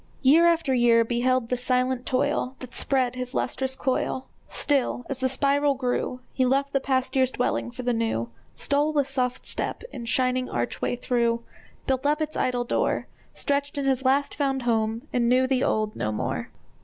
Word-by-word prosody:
Year 315 +6 +6
after 330 -5 +2
year 240 -2 +5
beheld 245 +1 +1
the 250 - 0
silent 255 0 0
toil 255 0 0
That 255 -1 -10
spread 255 -3 +1
his 255 +1 -5
lustrous 265 +1 -1
coil; 260 0 -1 0.2
Still, 270 -3 0
as 270 - -3
the 260 0 +1
spiral 280 +2 +2
grew, 250 -1 -2
He 260 - +1
left 275 +2 +1
the 275 - +3
past 260 -1 -1
year's 260 -1 +4
dwelling 245 -1 -1
for 250 +1 -7
the 245 0 +1
new, 225 - -1 0.2
Stole 290 +2 +1
with 285 -3 +2
soft 255 -2 -2
step - - -3
its 235 -3 -6
shining 255 0 +1
archway 120 - -2
through, 235 -1 0 0.4
Built 265 +1 0
up 300 +1 +2
its 310 0 -3
idle 245 -1 0
door, 240 - 0 0.3
Stretched 285 0 -1
in 280 - -1
his 265 -1 +1
last 275 +2 +2
found 270 -3 -1
home, 225 +2 0
and 235 -1 +2
knew 255 +1 +4
the 260 0 +1
old 215 -1 0
no 105 - -2
more. 105 - -3
255 Hz, 180 wpm, -25 LUFS, 245-275 Hz, 0.4 s, Year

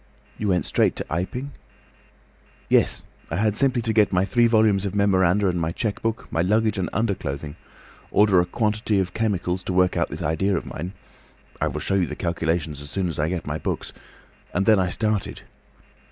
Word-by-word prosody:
"You 105 - -1
went 90 -2 +1
straight - - +2
to - - -3
Iping?" 125 - -3 1.2
"Yes. - - +4 0.3
I - - -3
had 105 +2 +1
simply 130 -1 +1
to 110 - 0
get 105 -2 +4
my 90 0 +2
three 120 +4 +3
volumes 110 -4 +3
of 100 -1 -3
memoranda 100 -1 +3
and 90 -2 0
my 80 0 -1
cheque 105 +3 -3
book, 115 0 -2
my 80 - +1
luggage 105 +2 +1
and 90 - -1
underclothing, 80 -9 -2 0.5
order 105 -3 +4
a 90 - +1
quantity 105 +1 0
of 95 -1 -2
chemicals 95 -5 -1
to 90 - -4
work 90 0 +3
out - - +1
this - - -6
idea 95 +5 +1
of - - -4
mine—I 90 +6 -8
will - - -4
show - - -1
you 95 -3 +2
the - - -5
calculations 80 -3 -2
as 70 - -9
soon 95 +3 -1
as 80 - -5
I 75 +2 +1
get 90 -2 -3
my 75 +1 -3
books—and 95 +2 -6
then 110 -3 +5
I 90 -1 +1
started. 105 +1 -2
95 Hz, 190 wpm, -24 LUFS, 90-105 Hz, 1.2 s, then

